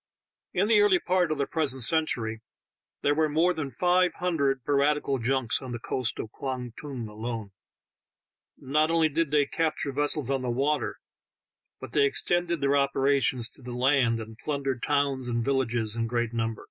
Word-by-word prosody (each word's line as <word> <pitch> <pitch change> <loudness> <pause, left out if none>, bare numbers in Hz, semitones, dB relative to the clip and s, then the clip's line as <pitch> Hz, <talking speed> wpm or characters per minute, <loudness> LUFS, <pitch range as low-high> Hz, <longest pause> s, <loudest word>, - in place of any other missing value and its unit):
In 190 +3 +1
the 215 -2 +5
early 205 -3 +5
part 180 -2 +1
of 155 - -1
the 140 - 0
present 135 -6 0
eentury 115 -7 +1 0.6
there 145 - +3
were 155 +1 +1
more 165 +4 +2
than 155 -5 -4
five 180 +8 +2
hundred 140 -7 0
piratieal 140 -2 +1
junks 130 -1 0
on 130 -2 -6
the 120 - -4
eoast 125 0 -1
of 110 - -6
Kwang 125 -3 -5
Tung 130 -6 -6
alone; 110 -1 -6 1.1
not 150 +4 +1
only 165 -1 +3
did 160 +1 0
they 145 -1 +3
eapture 155 -2 -1
vessels 145 -1 0
on 135 -1 0
the 125 - -3
water, 135 +3 0 0.8
but - - -9
they 140 - +4
extended 175 +3 0
their 140 0 +2
operations 140 -2 +2
to - - -9
the 125 -1 -7
land, 125 -2 +2
and 110 +1 -9
plundered 135 -4 -2
towns 140 -3 0
and 115 -1 -1
villages 120 -5 0
in 115 0 -1
great 120 0 -1
number. 115 -1 -2
140 Hz, 170 wpm, -27 LUFS, 120-150 Hz, 1.1 s, the